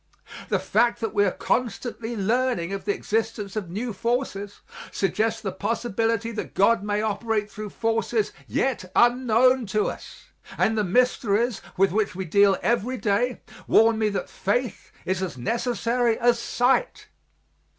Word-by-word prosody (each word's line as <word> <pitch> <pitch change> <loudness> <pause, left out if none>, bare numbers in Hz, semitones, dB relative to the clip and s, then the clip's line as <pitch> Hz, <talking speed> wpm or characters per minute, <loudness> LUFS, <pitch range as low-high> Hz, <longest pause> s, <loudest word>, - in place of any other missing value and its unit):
The - - +2
fact 235 +2 +1
that 225 - -2
we 205 0 +3
are - - +3
constantly 235 +1 -2
learning 210 -3 0
of 195 - -5
the 205 - +2
existence 220 -2 -2
of 200 -5 -4
new 220 +6 -4
forces 205 -2 -3 0.3
suggests 215 +3 0
the 195 - -2
possibility 230 +2 -1
that 220 - -6
God 215 +3 +4
may 205 +1 -1
operate 215 0 -1
through 215 0 -6
forces 225 - -1
yet 225 -9 -1
unknown 245 0 +4
to 210 +1 0
us, - - -12 0.3
and 220 - +2
the 215 - +1
mysteries 230 +1 +1 0.2
with 195 0 +3
which 210 -1 0
we 190 0 -4
deal 200 +3 +4
every 240 +2 0
day 230 +3 0 0.3
warn 225 0 +4
me 215 -1 +2
that 200 - -3
faith 240 +3 -2
is 185 0 -1
as 180 -8 -4
necessary 235 - 0
as 240 0 +3
sight. 255 - 0
225 Hz, 150 wpm, -24 LUFS, 200-240 Hz, 0.3 s, God